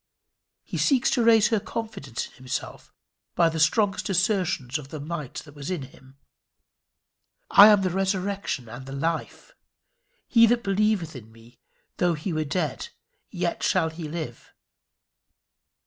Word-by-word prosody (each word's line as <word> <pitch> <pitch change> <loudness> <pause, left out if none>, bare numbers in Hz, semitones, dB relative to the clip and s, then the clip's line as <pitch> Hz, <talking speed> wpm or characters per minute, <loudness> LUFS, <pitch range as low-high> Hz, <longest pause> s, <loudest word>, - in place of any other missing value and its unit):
He - - -5
seeks 265 -3 +3
to 240 - +2
raise 225 -2 +5
her 225 -2 +2
confidence 220 - -5
in - - -16
himself 130 0 -6 0.4
by 170 -1 +4
the 160 0 -4
strongest 195 +6 +2
assertions 185 - 0
of 140 - -10
the 155 - -7
might 150 -2 -6
that 145 - -14
was 145 +1 -7
in 180 -7 -3
him. 130 +1 -16 1.3
"I 200 +1 +10
am 205 -2 +5
the 185 - 0
resurrection 195 - -2
and 120 +4 -9
the 135 - -7
life: 160 +3 -3 0.7
he 230 -1 +6
that 240 +1 +1
believeth 195 -5 0
in 110 -3 -11
me, 115 +1 -19 0.4
though 175 -2 +2
he 160 +4 -4
were 155 0 -1
dead, 160 - -2 0.4
yet - - -3
shall 165 -5 +1
he 160 -1 -7
live!" 155 -8 -7
170 Hz, 145 wpm, -25 LUFS, 140-200 Hz, 1.3 s, I